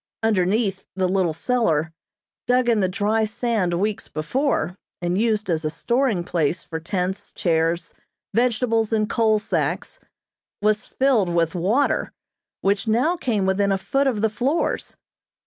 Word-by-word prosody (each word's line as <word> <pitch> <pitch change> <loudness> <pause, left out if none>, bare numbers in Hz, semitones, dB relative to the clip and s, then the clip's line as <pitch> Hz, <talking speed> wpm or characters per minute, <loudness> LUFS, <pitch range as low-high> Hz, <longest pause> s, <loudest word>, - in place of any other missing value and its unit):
Underneath, 200 -1 +1
the 190 -1 +1
little 185 -2 +1
cellar, 165 -3 0 0.5
dug 250 0 +3
in 230 -3 +3
the 185 -2 +2
dry 210 +4 +1
sand 215 -5 0
weeks 210 +4 -1
before, 180 - -1 0.2
and 175 0 -1
used 220 +1 +1
as 165 -3 0
a 155 - 0
storing 235 - 0
place 170 -1 -1
for 160 - -5
tents, 180 +3 -3
chairs, 165 0 0 0.4
vegetables 230 -1 +1
and 215 -1 +1
coal 220 -1 +2
sacks, 210 - -2 0.6
was 210 0 +1
filled 255 -9 +2
with 170 -1 +1
water 205 +11 +1 0.5
which 200 +2 +1
now 250 +11 +2
came 230 - -1
within 195 +1 +2
a 195 - +2
foot 270 +8 0
of 230 -6 0
the 220 - +3
floors. 260 +9 -1
205 Hz, 145 wpm, -23 LUFS, 175-230 Hz, 0.6 s, dug